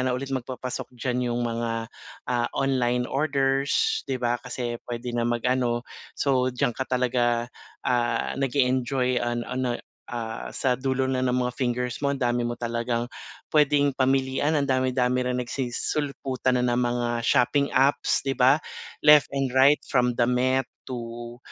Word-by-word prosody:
na 130 -1 0
ulit 135 +1 -5
magpapasok 130 -1 -5
diyan 125 0 -1
'yung 120 0 -1
mga, 115 -1 -3 0.3
ah, 120 -1 0
online 125 -2 +1
orders, 140 - +1
'di 135 - 0
ba, 120 -1 -1
kasi 120 -1 -4
puwede 120 0 -4
na 120 0 0
mag-ano, 120 0 0 0.3
so 130 -2 +2
diyan 125 0 0
ka 130 +3 -4
talaga, 120 -1 +1 0.3
ah, 120 -1 +1
nag-e-enjoy 130 -1 +1
an 120 0 -1
ano, 125 -1 -2 0.4
ah, 115 -2 -5
sa 130 -2 +1
dulo 130 0 0
na 130 -1 0
ng 125 -1 +1
mga 125 - -3
fingers 125 0 -2
mo 140 - +2
ang 140 - -2
dami 120 -1 +1
mo 120 - -1
talagang 120 0 -1 0.4
puwedeng 145 -2 +3
pamilian, 135 +2 +1
ang 140 - 0
dami-dami 130 -1 +1
rin 125 0 -1
nagsisisulputan 130 +1 -2
na 125 -1 +1
ng 120 - +1
mga 120 0 -1
shopping 140 +4 +2
apps 135 +2 +3
'di 135 -1 -2
ba, 130 +3 +5 0.4
left 150 -1 +6
and 135 -2 -2
right 135 +3 +6
from 125 -2 +2
damit 125 +2 +1 0.2
to 120 -1 -7
125 Hz, 150 wpm, -25 LUFS, 120-135 Hz, 0.4 s, left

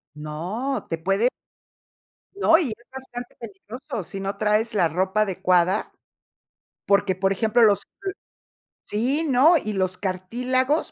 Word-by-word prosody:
No, 180 - -4
te 165 - -1
puede 195 +8 +1 1.1
No, 330 -5 +5
y 315 -8 0
es 230 +2 -9
bastante 250 -2 -8
peligroso, 230 - -7
si 195 +3 -7
no 195 +1 -4
traes 215 +2 +1
la 180 -5 +3
ropa 190 +6 0
adecuada, 185 -1 +1 1.0
porque, 200 -1 +3
por 195 +1 +1
ejemplo, 220 +4 +2
los 205 -2 +5 0.2
l 390 - -6 0.8
sí, 265 +10 0
¿no?, 280 +6 +5
y 215 -6 -3
los 185 -1 -1
cartílagos, 250 - -1
210 Hz, 130 wpm, -24 LUFS, 190-250 Hz, 1.1 s, No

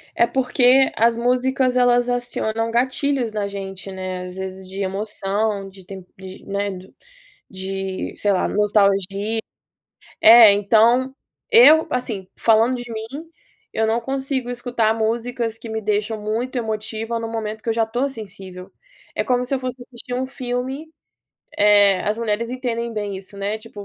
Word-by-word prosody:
É 235 - +3
porque 260 +1 +3
as 230 +1 +3
músicas 255 +1 +1
elas 245 0 +3
acionam 230 -2 -2
gatilhos 260 0 0
na 210 -2 -2
gente, 195 -1 -7
né, 185 -1 -5
às 180 - -10
vezes 190 0 -6
de 195 +1 -5
emoção, 200 +1 -2
de 190 -1 -16
tep 190 -1 -10
de 190 0 -11
né, 200 +1 -2 0.8
de 190 0 -5
sei 205 - +1
lá, 185 - +1
nostalgi 200 +1 +1 0.8
é, 225 -2 +9
então, 230 +6 +3 0.4
eu, 385 -9 +7
assim, 225 -6 -3
falando 225 +2 +4
de 245 -1 -8
mim, 220 0 -5 0.7
eu 220 0 +1
não 225 +2 +1
consigo 265 0 -2
escutar 240 -2 0
músicas 230 +1 -2
que 225 - -9
me 220 0 -3
deixam 215 +1 -1
muito 225 +5 -3
emotiva 220 0 -3
no 225 - -4
momento 220 -1 -5
que - - -7
eu - - +3
já 225 0 +2
tô 245 +5 -1
sensível. 195 -6 -10 0.4
É - - 0
como 250 0 +1
se 275 - 0
eu 265 - -2
fosse 255 -1 -4
assistir 245 0 -8
um 255 +1 -1
filme 260 +4 -4 0.7
eh, 205 -2 +5
as 210 +2 -1
mulheres 230 0 -1
entendem 235 -2 -3
bem 205 -3 -4
isso, 190 +1 -11
né. 200 +2 -2
Tipo, 215 -2 -11
225 Hz, 155 wpm, -21 LUFS, 200-245 Hz, 0.8 s, é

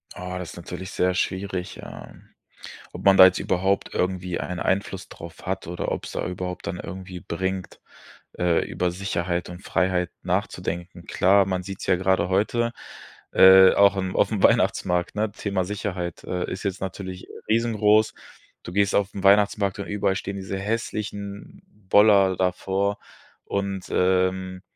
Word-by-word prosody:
Oh, 90 0 -6
das 90 - -6
ist - - -12
natürlich 90 +2 -7
sehr 90 0 +1
schwierig, 95 0 -3
ähm. - - -12 0.6
Ob - - -9
man 100 -1 +6
da 95 - +10
jetzt 95 0 +4
überhaupt 95 +2 0
irgendwie 90 -1 -1
einen 90 +5 -4
Einfluss 95 0 -2
drauf 85 -1 -11
hat 95 +1 -3
oder 85 +1 -4
ob's - - -4
da - - -3
überhaupt 90 0 -5
dann 90 - -4
irgendwie 95 -1 -7
bringt, 95 +2 -4 0.6
äh, 90 -2 +2
über 90 -1 -1
Sicherheit 90 -2 -2
und 90 +2 -10
Freiheit 90 -1 0
nachzudenken. 90 -2 -3
Klar, 100 +2 +4
man 95 -1 -2
sieht's 95 +1 -7
ja 95 - +4
gerade 95 -1 +1
heute, 115 +5 +1 0.6
äh, 95 0 +8
auch 100 0 +5
im 95 -1 -2
aufm 105 -4 +1
Weihnachtsmarkt, 90 0 +2
ne, 105 0 -1
Thema 100 -2 -2
Sicherheit, 95 -4 -4
äh, 90 -1 -3
ist 95 - -5
jetzt 100 -1 -2
natürlich 95 -1 -6 0.2
riesengroß. 110 -1 +3 0.5
Du - - -8
gehst 100 0 +2
aufm 100 -1 -1
Weihnachtsmarkt 100 0 +3
und 100 - -5
überall 100 -2 0
stehen 100 0 -4
diese 95 0 -5
hässlichen 105 - -5 0.3
Boller 100 -3 +5
davor. 95 +2 -1 0.5
Und, 100 -1 -3
ähm, 95 0 +1
95 Hz, 150 wpm, -24 LUFS, 90-100 Hz, 0.6 s, da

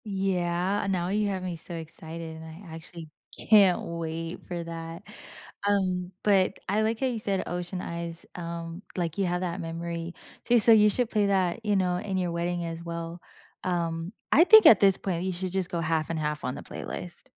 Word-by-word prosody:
Yeah, 190 -1 -1
and 195 - -2
now 180 -1 -1
you 210 +1 0
have 190 -2 -3
me 180 -2 -4
so 170 +1 -2
excited, 160 0 -5
and 160 - -10 0.2
I 165 - -11
actually 165 -1 -10 0.4
can't 200 -4 +6
wait 165 0 -5
for 175 -1 -4
that. 165 +1 -8 0.6
Um, 185 -3 0
but 195 -2 +2
I 205 +3 +1
like 220 +1 -1
how 270 - 0
you 240 -3 -3
said, 200 -3 +3
Ocean 180 +1 -4
Eyes. 170 -1 +1
Um, 170 0 -6 0.2
like, 170 -3 -2
you 195 - +2
have 175 +1 -2
that 180 0 -3
memory. 170 +1 -5 0.3
So 240 - +3
so 230 +1 +9
you 210 -1 +6
should 240 +2 0
play 210 -2 +2
that, 190 +1 0
you 205 -1 +1
know, 180 -2 +1
in 190 +1 -3
your 180 -2 -1
wedding 170 0 -2
as 165 0 -6
well. 170 0 -6 0.4
Um, 170 0 -3 0.2
I 315 - +7
think 440 +4 +8
at 225 - +8
this 195 -2 +8
point, 180 -3 -3
you 190 - -1
should 185 +1 -4
just 190 -1 +2
go 170 - -3
half 160 -1 -1
and 165 - -2
half 150 0 -3
on 125 - -3
the - - -9
playlist. - - -7
175 Hz, 205 wpm, -27 LUFS, 165-195 Hz, 0.6 s, so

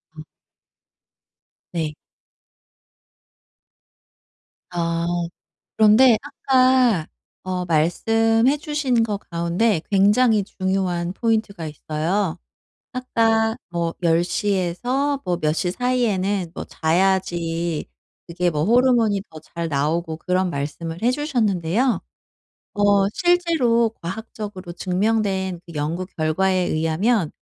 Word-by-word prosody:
음. 155 - -9 1.5
네. 160 -3 -2 2.8
아 170 -1 -1 0.7
그런데 220 +2 +6
아까 255 - +2 0.4
어 185 -1 -3
말씀해 225 - +2
주신 295 -6 0
것 210 -3 -2
가운데 170 +3 +1
굉장히 210 +2 +4
중요한 185 -3 -2
포인트가 215 -6 -1
있어요. 160 +4 -2 0.6
아까 225 -2 +2
뭐 170 -1 -2
10 165 0 +3
시에서 205 +10 -1
뭐 180 -2 -1
몇 155 -3 0
시 175 +2 -1
사이에는 205 -6 0
뭐 - - -5
자야지 170 -1 0 0.4
그게 175 +1 0
뭐 150 -2 -1
호르몬이 235 -3 +3
더 160 - -11
잘 170 +2 -6
나오고 160 +3 -1
그런 185 +2 0
말씀을 165 +3 -5
해 240 +2 +3
주셨는데요. 240 - 0 0.7
어 205 -1 +3
실제로 325 -11 +2
과학적으로 195 -1 -6
증명된 190 -1 -1
그 170 - -11
연구 155 +5 -2
결과에 180 +2 0
의하면 165 +5 +1
190 Hz, 200 characters per minute, -22 LUFS, 170-225 Hz, 2.8 s, 그런데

